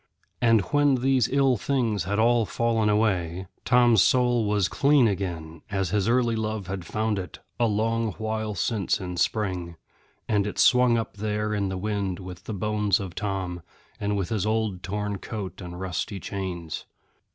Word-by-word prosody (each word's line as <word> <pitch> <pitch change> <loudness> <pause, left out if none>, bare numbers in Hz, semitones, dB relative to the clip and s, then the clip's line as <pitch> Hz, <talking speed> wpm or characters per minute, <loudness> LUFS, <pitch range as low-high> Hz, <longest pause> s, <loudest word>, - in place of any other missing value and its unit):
And 115 -3 +5
when 145 -2 +4
these 130 -1 +2
ill 135 -2 +3
things 115 -7 0
had 100 +2 -1
all 115 0 +3
fallen 115 -2 +1
away, 95 -4 +1 0.2
Tom's 120 -4 +5
soul 120 +2 +3
was 105 -3 +2
clean 140 -3 +4
again, 85 -5 -4
as 95 -3 -1
his 105 0 +1
early 120 -1 +2
love 110 -2 -2
had 95 -2 -5
found 110 -1 -1
it, 90 - -7 0.2
a 120 - +3
long 115 +1 0
while 110 -1 -3
since 105 +3 0
in 90 -2 -5
spring; 90 -5 -1 0.5
and 105 -2 +1
it 105 - -5
swung 125 -1 +5
up 115 -2 -4
there 105 +1 -1
in 100 -2 0
the 95 - -3
wind 100 -2 -2
with 90 0 -9
the - - -5
bones 105 0 +1
of 95 -3 -6
Tom, 95 -3 -3 0.4
and 105 0 -1
with 95 -3 -2
his 110 -4 -1
old 110 -4 -1
torn 105 0 -3
coat 100 -2 -6
and 90 -1 -7
rusty 95 +2 -3
chains. 90 -5 -5
105 Hz, 170 wpm, -26 LUFS, 95-115 Hz, 0.5 s, And